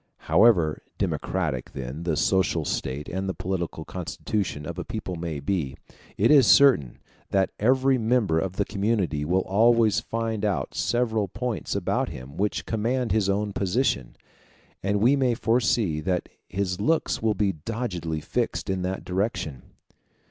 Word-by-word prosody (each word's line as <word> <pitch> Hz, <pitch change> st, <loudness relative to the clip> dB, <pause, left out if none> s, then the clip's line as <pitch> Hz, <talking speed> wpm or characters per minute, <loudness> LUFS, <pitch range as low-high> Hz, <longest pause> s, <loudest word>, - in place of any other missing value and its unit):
However 95 Hz, -8 st, +4 dB, 0.2 s
democratic 80 Hz, -9 st, -2 dB
then 65 Hz, +4 st, -6 dB
the 80 Hz, -3 st, 0 dB
social 95 Hz, -4 st, +2 dB
state 70 Hz, +2 st, -3 dB
and 95 Hz, +1 st, -3 dB
the 95 Hz, -, -3 dB
political 85 Hz, -4 st, -3 dB
constitution 90 Hz, -2 st, -3 dB
of 85 Hz, +2 st, -5 dB
a -, -, -3 dB
people 110 Hz, -6 st, -5 dB
may 80 Hz, -3 st, -4 dB
be, 70 Hz, -3 st, -2 dB, 0.4 s
it -, -, +4 dB
is 140 Hz, -6 st, +7 dB
certain 130 Hz, -, +5 dB, 0.3 s
that 95 Hz, -1 st, +1 dB
every 130 Hz, +3 st, +3 dB
member 110 Hz, -8 st, +2 dB
of 90 Hz, +2 st, -2 dB
the 100 Hz, -, 0 dB
community 100 Hz, -7 st, 0 dB
will 90 Hz, +5 st, +1 dB
always 110 Hz, +1 st, +4 dB
find 115 Hz, -1 st, -3 dB
out 100 Hz, -4 st, -1 dB
several 115 Hz, -4 st, 0 dB
points 115 Hz, +4 st, -3 dB
about -, -, 0 dB
him 65 Hz, +3 st, -9 dB
which 100 Hz, +4 st, -1 dB
command 115 Hz, +1 st, -1 dB
his 100 Hz, -1 st, +2 dB
own 100 Hz, +1 st, 0 dB
position; 95 Hz, -, 0 dB, 0.7 s
and 100 Hz, +1 st, 0 dB
we 125 Hz, +6 st, +5 dB
may 130 Hz, -4 st, +2 dB
foresee 115 Hz, -8 st, +1 dB
that 90 Hz, +2 st, -1 dB, 0.2 s
his 95 Hz, 0 st, -2 dB
looks 160 Hz, +9 st, +1 dB
will 110 Hz, -1 st, +1 dB
be 100 Hz, 0 st, +1 dB
doggedly 85 Hz, -3 st, -4 dB
fixed 95 Hz, -, -2 dB
in 95 Hz, -1 st, -1 dB
that 95 Hz, +1 st, -3 dB
direction. 90 Hz, -, -2 dB
100 Hz, 150 wpm, -25 LUFS, 85-115 Hz, 0.7 s, is